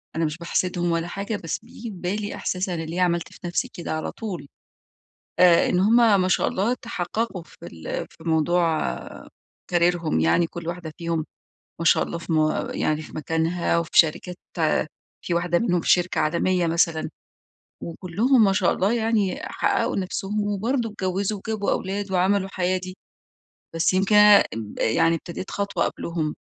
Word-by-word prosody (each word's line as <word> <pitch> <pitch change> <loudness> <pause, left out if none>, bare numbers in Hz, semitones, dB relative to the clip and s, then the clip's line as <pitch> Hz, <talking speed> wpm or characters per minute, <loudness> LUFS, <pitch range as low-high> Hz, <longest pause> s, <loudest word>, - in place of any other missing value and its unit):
أنا 165 - +1
مش 150 +1 -3
باحسدهم 175 0 -1
ولا 165 +1 -1
حاجة، 200 +4 -4
بس 165 - -3
بييجي - - -15
في 200 - -8
بالي 200 +4 -3
إحساس 185 +1 -2
أنا 170 -2 -2
ليه 170 +3 -3
عملت 170 -1 0
في - - -15
نفسي 175 - -1
كده 170 - -6
على 155 0 -3
طول. 195 -10 -6 0.9
آآ، 180 -2 +6
إن 180 - +2
همَ 220 -1 +5
ما 185 - +1
شاء - - +2
الله 220 +6 0
تحققوا 225 -4 -4
في - - -19
ال 80 -1 -5
في - - -17
موضوع 165 0 +1 0.7
كاريرهم، 170 - +2
يعني 80 - +3
كل 170 0 -8
واحدة 170 -3 -5
فيهم 165 -2 -2 0.6
ما - - -2
شاء - - +5
الله 170 - -4
في 165 0 -5
م 155 -1 +1
يعني 155 0 0
في - - -12
مكانها، 165 +2 0
وفي 170 -2 -3
شركات 175 +2 +3 0.9
في 175 - -1
واحدة 175 0 +1
منهم 180 -7 +1
في - - -1
شركة 180 0 +3
عالمية 170 +3 +1
مثلًا، 165 -1 +1 0.7
وكلهم 210 +9 +2
ما 195 - +4
شاء 190 -2 +2
الله 195 +4 +1
يعني 225 -4 0
حققوا - - 0
نفسهم، 195 +2 -2
وبرضو 225 +4 -1
اتجوزوا، 195 +1 -2
وجابوا 215 -2 -1
أولاد 195 +1 -2
وعملوا 190 +1 +2
حياة 185 0 0
دي. 185 +1 -8 0.8
بس 165 +3 +2
يمكن 195 +3 +2
انا 210 -1 +8 0.4
يعني 165 +9 +3
ابتديت 170 +3 -7
خطوة 200 -4 -1
قبلهم. 160 -3 -3
180 Hz, 165 wpm, -24 LUFS, 170-200 Hz, 0.9 s, انا